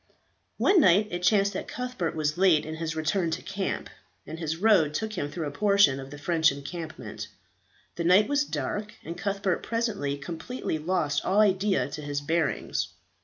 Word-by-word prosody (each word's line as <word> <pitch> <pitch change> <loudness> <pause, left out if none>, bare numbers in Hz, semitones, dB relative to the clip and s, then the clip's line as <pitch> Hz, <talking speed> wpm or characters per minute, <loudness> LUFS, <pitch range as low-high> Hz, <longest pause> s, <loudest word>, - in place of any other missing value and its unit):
One 385 -4 +5
night 200 +2 +4
it 175 0 -3
chanced 200 +2 +3
that - - -4
Cuthbert 250 -10 -3
was 150 -1 0
late 180 -4 +4
in 160 0 -6
his 165 0 -3
return 165 +3 0
to 160 - -3
camp, 195 -1 -3 0.4
and 160 +3 -7
his 160 -1 -2
road 180 -7 +4
took 220 +3 -2
him 145 -7 -3
through 160 +2 -4
a 145 - -3
portion 200 -5 +4
of 135 0 -8
the 145 - -9
French 160 +1 +2
encampment; 140 - -7 0.7
the 170 - -1
night 185 +5 +5
was 285 +1 +2
dark, 205 - -4
and 165 +2 -5
Cuthbert 195 -2 -1
presently 215 -12 -2
completely 165 - -4
lost 150 -3 0
all 195 +3 +2
idea 195 -1 +3
as 140 - -9
to - - -6
his 145 -1 -3
bearings. 155 0 -1
170 Hz, 180 wpm, -27 LUFS, 150-200 Hz, 0.7 s, One